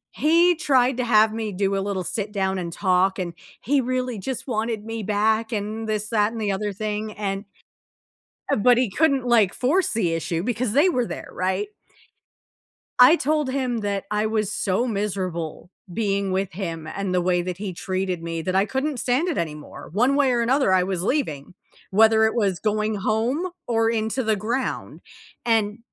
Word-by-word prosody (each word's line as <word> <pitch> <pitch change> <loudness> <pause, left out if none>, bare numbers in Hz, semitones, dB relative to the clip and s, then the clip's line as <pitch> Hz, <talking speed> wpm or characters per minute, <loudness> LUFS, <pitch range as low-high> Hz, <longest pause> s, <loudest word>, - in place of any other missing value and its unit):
he 335 +3 +4
tried 260 -5 +2
to 250 - 0
have 215 -2 +4
me 220 -1 -3
do 195 +1 0
a 195 - 0
little 195 -2 -2
sit 205 +3 -4
down 190 -2 -1
and 170 -1 -4
talk, 185 +1 +2
and 175 -3 -3 0.3
he 275 +2 +1
really 255 -2 -2
just 260 +5 -4
wanted 220 -2 -2
me 225 0 -4
back 215 +2 +1
and 220 +1 -3
this, 215 -1 -2
that, 210 -1 +2
and 230 - -6
the 210 -2 0
other 205 +1 -2
thing, 215 +1 -4
and 200 0 -3 1.1
Uh, - - +4
but 240 +3 +4
he 250 -3 +2
couldn't, 275 +3 +2
like, 225 -6 +4
force 320 +9 +1
the 185 -7 +1
issue 165 +1 -2
because 235 0 -1
they 300 +7 +5
were 250 -8 0
there, - - -7
right? 190 +2 -1 1.3
I 255 +6 +9
told 300 -3 0
him 255 -3 -1
that 200 -2 -2
I 210 +1 +1
was 215 -2 -1
so 200 +5 0
miserable 185 -5 -3 0.2
being 200 -1 -1
with 190 -1 -1
him, 165 -4 -5
and 195 +3 -3
the 180 - +2
way 180 0 +1
that 180 0 -4
he 195 -2 -5
treated 185 -1 -3
me, 165 -1 -3
that 185 +3 -2
I 195 +1 +4
couldn't 265 +3 -2
stand 260 +8 +1
it 340 - -1
anymore. 150 -3 -5
One 245 - +2
way 280 -2 +3
or 240 -1 +1
another, 255 -3 +2
I 185 - +4
was 180 -2 -2
leaving, 180 - -2 0.4
whether 220 +2 +5
it 220 - 0
was 195 -6 +1
going 215 0 0
home, 230 - 0 0.2
or 225 -1 +2
into 225 +3 -1
the 215 -2 +1
ground. 240 +6 -3 0.4
And 220 -2 +1
215 Hz, 185 wpm, -23 LUFS, 190-245 Hz, 1.3 s, I